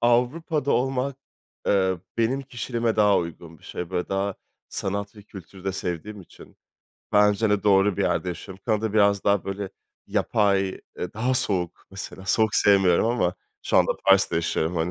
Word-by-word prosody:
Avrupa'da 135 +5 +1
olmak, 130 +2 0 0.5
eee, 95 -3 +2 0.2
benim 120 +4 +1
kişiliğime 120 -3 -2
daha 105 -2 +5
uygun 85 -1 -7
bir - - -28
şey. 90 0 -6
Böyle 90 -1 -2
daha 95 0 -1 0.3
sanat 100 +2 -4
ve 105 - -12
kültürü 95 -2 -13
de 95 - -1
sevdiğim 95 +2 -5
için. 90 - -16 0.6
Bence 105 +1 +4
de 105 -1 +1
doğru 100 -1 +4
bir - - 0
yerde 90 - 0
yaşıyorum. 95 +2 -7
Kanada 110 -2 0
biraz 100 -2 +3
daha 100 -1 +2
böyle 95 0 -4 0.4
yapay, 100 -2 +2 0.3
eee, 90 - -4
daha 125 +4 0
soğuk. 90 -7 -1
Mesela, 95 0 -8
soğuk 110 +2 +2
sevmiyorum 95 -4 +4
ama 115 -7 +1 0.3
şu - - +1
anda - - +4
Paris'te 95 -3 +4
yaşıyorum 85 0 -1
hani. 80 +1 0
100 Hz, 160 wpm, -25 LUFS, 95-110 Hz, 0.6 s, daha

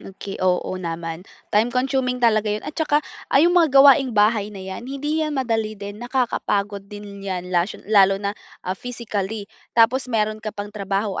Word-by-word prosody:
Okey, 195 0 -8
oo, 185 -1 +1
naman. 165 -1 -4 0.3
Time 215 +3 +4
consuming 255 0 0
talaga 220 -3 +2
'yon 210 +1 -2
at 300 - -5
tsaka, 300 -2 +1 0.2
ah, - - +2
yung 335 +5 +5
mga 345 -3 +5
gawaing-bahay 235 -7 +5
na 210 - -11
yan, 190 +6 -7
hindi 295 +3 -2
yan 305 -2 -1
madali 225 -4 -1
din, 205 +1 -8
nakakapagod 210 -5 -1
din 205 -1 -9
yan, 185 -2 -4
lashon 175 +3 0
lalo 195 -2 +5
na, 200 0 -2 0.3
ah, 185 - -1
physically, 215 -2 -4 0.3
tapos 245 +3 +4
meron 215 -2 0
ka 215 - -4
pang 205 0 -7
trabaho. 200 0 -2
215 Hz, 170 wpm, -22 LUFS, 200-250 Hz, 0.3 s, yung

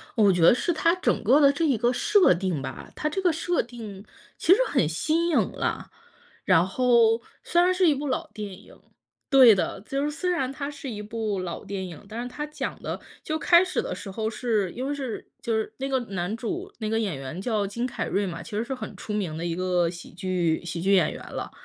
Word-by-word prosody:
我 205 -4 +5
觉 175 - 0
得 165 - +8
是 345 +7 0
它 335 +2 +3
整 365 - 0
个 265 +8 +5
的 280 -1 +6
这 320 +3 0
一 270 -6 +2
个 240 +3 +2
设 390 - +4
定 175 -5 -2
吧， 130 -2 -7
它 305 - -1
这 385 +5 -2
个 355 -2 +3
设 345 +2 0
定 220 -5 -9 0.3
其 365 - +5
实 440 - +2
很 180 - +2
新 320 - 0
颖 320 - +2
了。 - - -3 0.5
然 165 +2 +5
后， 235 +1 +3 0.2
虽 345 - +3
然 365 +1 +4
是 365 -1 +3
一 300 - +5
部 290 +2 -4
老 260 - -2
电 210 -2 -6
影 - - -18 0.5
对 260 -5 +8
的， 195 0 -1
就 275 +6 -2
是 295 - 0
虽 360 +4 -2
然 270 -7 0
它 280 0 -4
是 280 -2 -7
一 210 -2 -5
部 215 -2 -3
老 180 -2 -5
电 190 -2 -4
影， 165 0 -10
但 230 +2 -5
是 - - -5
它 295 +4 -5
讲 300 - -5
的 - - -4 0.2
就 315 0 -2
开 345 +3 +5
始 365 - -1
的 - - -4
时 200 - -7
候 220 +3 -3
是 220 -6 -1
因 255 +3 -4
为 290 - -1
是 265 -5 -5
就 230 -1 -1
是 220 -1 -1
那 270 +1 -3
个 265 -1 +1 0.2
男 180 +4 -2
主 350 - -4
那 215 -1 -2
个 225 0 +1
演 195 -9 -1
员 135 +6 -6
叫 210 -1 0
金 235 +5 -3
凯 250 - -3
瑞 200 +1 0
嘛， 170 -3 -5
其 - - -11
实 220 - 0
是 265 +3 -4
很 255 - -7
出 210 - -6
名 180 -7 -2
的 170 - -4
一 170 -1 -1
个 180 -2 +1
喜 175 -1 -11
剧 175 -2 -1
喜 170 0 -4
剧 195 +2 +3
演 170 -5 +3
员 - - -9
了。 - - -5
225 Hz, 260 characters per minute, -26 LUFS, 190-285 Hz, 0.5 s, 得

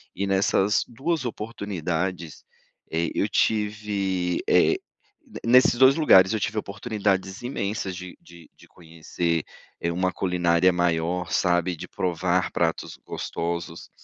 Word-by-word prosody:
E 100 - -2
nessas 95 +1 +2
2 145 +6 -2
oportunidades, 95 - -4 0.5
eh, 80 0 0
eu - - 0
tive, 105 -4 0
eh, - - +4 0.7
nesses 125 +1 +5
2 130 +2 +6
lugares, 95 - +6
eu 110 - 0
tive 110 - -2
oportunidades 100 -2 -2
imensas, 100 -6 -3
de 90 0 -9
de 85 -2 -16
de - - -18
conhecer, 85 0 -3 0.4
eh, 85 - -1
uma 90 +2 0
culinária 90 -1 +2
maior, 85 0 0
sabe, 90 0 +1
de - - -8
provar 90 +1 -1
pratos 85 -1 -2
gostosos, 85 0 -5
95 Hz, 120 wpm, -25 LUFS, 85-105 Hz, 0.7 s, 2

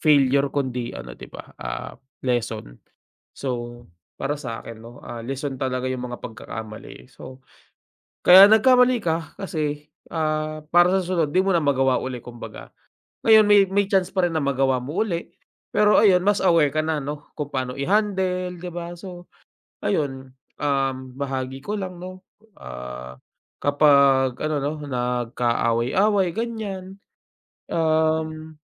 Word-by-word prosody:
failure 140 -2 +4
kundi 125 -4 -3
ano - - -8
di - - -10
ba, - - -12
ah, - - -5 0.3
lesson. 115 - -2 0.6
So, 120 -2 -5 0.3
para 145 - -1
sakin 115 -3 -7
no, 115 +1 -12
ah, 120 -1 -7
lesson 135 +1 -4
talaga 130 -1 -2
yung 125 -1 -4
mga 120 - -7
pagkakamali 110 -2 -8
so, 130 0 -12 0.8
kaya 190 +2 +10
nagkamali 250 +3 +5
ka 165 -2 -2
kasi, 150 -5 -3 0.2
ah, 155 -1 -1
para 175 +2 +5
sa - - +1
susunod 170 -5 -1
di 185 - +4
mo 195 - 0
na 165 - +1
magawa 135 -2 +2
uli 130 -2 -5
kumbaga. 120 -1 -10 0.6
Ngayon 220 -1 +8
may 205 -1 +7
may 200 +1 +1
chance 190 -2 +1
pa 190 - +2
rin 165 - -6
na 155 - 0
magawa 135 -1 +1
mo 145 +11 -2
uli, 175 -6 -3 0.5
pero 210 0 +4
ayun, 190 -4 +5
mas 205 +2 +2
aware 165 -5 +4
ka 155 +2 -1
na 155 -1 -1
ano, 145 +1 -6
kung 150 -2 -5
paano 130 -2 -3
i-handle, 185 +2 0
di 180 0 -6
ba? 170 0 -6
So 175 0 -10 0.6
ayun, 135 +3 -2 0.3
um, 135 -2 +1 0.2
bahagi 135 -1 -3
ko 210 - -2
lang 185 -3 -5
no, 185 +1 -9 0.3
ah, 60 +1 -8 0.4
kapag 140 -3 +4
ano 155 0 -1
no 145 - 0 0.2
nag-kaaway-away 125 - +1
ganyan, 200 -3 -5 0.7
um 160 -1 0
150 Hz, 140 wpm, -23 LUFS, 130-180 Hz, 0.8 s, kaya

